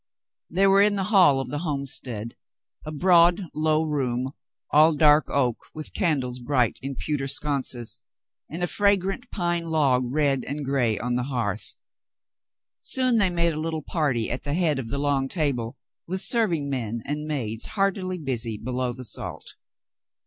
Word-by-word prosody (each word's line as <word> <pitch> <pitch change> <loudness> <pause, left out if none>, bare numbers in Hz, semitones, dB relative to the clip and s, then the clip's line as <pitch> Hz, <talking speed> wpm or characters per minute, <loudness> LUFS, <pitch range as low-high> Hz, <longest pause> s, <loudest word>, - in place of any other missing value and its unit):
They 190 +3 +2
were 195 0 +5
in 205 0 +3
the 195 - -1
hall 175 -9 +6
of 135 - -4
the 145 - -3
homestead, 135 -7 -3 0.5
a 155 - -6
broad, 175 +3 +4
low 155 0 +1
room, 130 -4 -1 0.4
all 155 +2 +5
dark 150 0 +5
oak, 125 -5 +1 0.2
with 155 -1 -8
candles 135 - -1
bright 125 -2 0
in 135 +1 -5
pewter 140 0 -2
sconces, 130 -5 -1 0.5
and 170 +3 -5
a - - +4
fragrant 200 +5 0
pine 175 -2 -2
log 140 -5 +2
red 140 -2 +2
and 145 +1 -4
gray 125 -6 +1
on 120 +3 -2
the 125 0 -1
hearth. 115 -6 -3 1.0
Soon 255 -2 +2
they 200 -4 +3
made 170 -1 +1
a 155 - -4
little 160 -1 -3
party 135 -10 0
at 125 - -3
the 145 0 -3
head 160 -6 +1
of 125 - -5
the 140 - -3
long 140 -1 0
table, 135 -6 -2 0.3
with 185 +2 -2
serving 180 -7 +1
men 120 -4 -3
and 150 +1 -4
maids 115 -7 -2
heartily 190 -2 0
busy 120 -8 -3
below 125 +2 -2
the 130 +1 -7
salt. - - -4
145 Hz, 165 wpm, -25 LUFS, 125-170 Hz, 1.0 s, hall